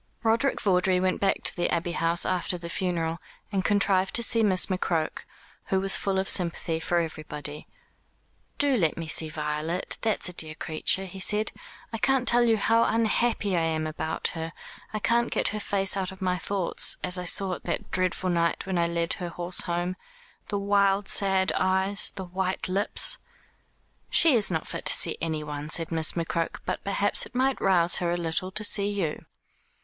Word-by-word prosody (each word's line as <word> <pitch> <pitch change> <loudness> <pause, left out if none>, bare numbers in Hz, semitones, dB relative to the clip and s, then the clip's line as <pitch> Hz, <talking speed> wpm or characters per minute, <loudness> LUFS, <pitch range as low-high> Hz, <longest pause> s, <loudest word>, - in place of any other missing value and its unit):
Roderick 230 +4 +2
Vawdrey 185 -1 +2
went 185 0 -1
back 195 -1 +1
to - - +2
the 175 - 0
Abbey 170 0 -1
House 170 0 +2
after 180 0 -1
the 170 -1 -8
funeral, 170 -3 -2 0.3
and 195 -2 -1
contrived 200 -2 +2
to 235 - +3
see 230 0 +3
Miss 190 -4 +3
McCroke, 175 -4 -2 0.4
who 190 - 0
was 195 0 +2
full 195 -1 -1
of 190 0 -1
sympathy 170 -2 0
for 175 +1 -1
everybody. 150 -2 -5 0.9
"Do 285 -3 +3
let 165 -7 +1
me 165 - -4
see 160 0 +2
Violet, 150 +3 -2
that's 220 -4 0
a 180 - -6
dear 155 -2 -1
creature," 160 +5 0
he 190 +1 -9
said. 210 +3 +1 0.4
"I 225 - -3
can't 265 +1 +1
tell 240 0 +4
you 225 -1 +3
how 225 +2 +3
unhappy 225 -2 +1
I 170 - +2
am 160 -1 -1
about 160 +1 -3
her. 165 -1 -6 0.4
I 215 - -3
can't 235 +3 +1
get - - +1
her 215 - -4
face 195 -1 0
out 190 -1 -2
of 190 - -12
my 185 -2 0
thoughts, 185 0 0
as 180 0 +1
I 180 - -5
saw 190 +2 +3
it - - -7
that - - -4
dreadful 185 0 0
night 170 0 0
when 190 -2 -1
I 170 - +2
led 170 0 -1
her 175 -1 -4
horse 175 +1 -1
home 175 +1 -2 0.5
the 205 - -2
wild 200 0 +1
sad 190 -1 +2
eyes, 190 +2 +2
the 190 -1 -6
white 185 +1 -2
lips." 200 - +1 0.9
"She 325 -3 +5
is 220 -4 +5
not 160 -3 -2
fit - - -7
to - - +6
see - - +2
anyone," 150 -2 -4
said 165 0 -1
Miss 160 -1 +2
McCroke; 165 -1 -3
"but - - -3
perhaps 200 +1 +1
it - - -25
might 265 +1 +1
rouse 175 -3 +3
her 175 -1 -1
a 175 - 0
little 170 +2 -1
to 215 - -1
see 205 -1 +2
you." 190 -7 -3
185 Hz, 190 wpm, -26 LUFS, 170-200 Hz, 0.9 s, to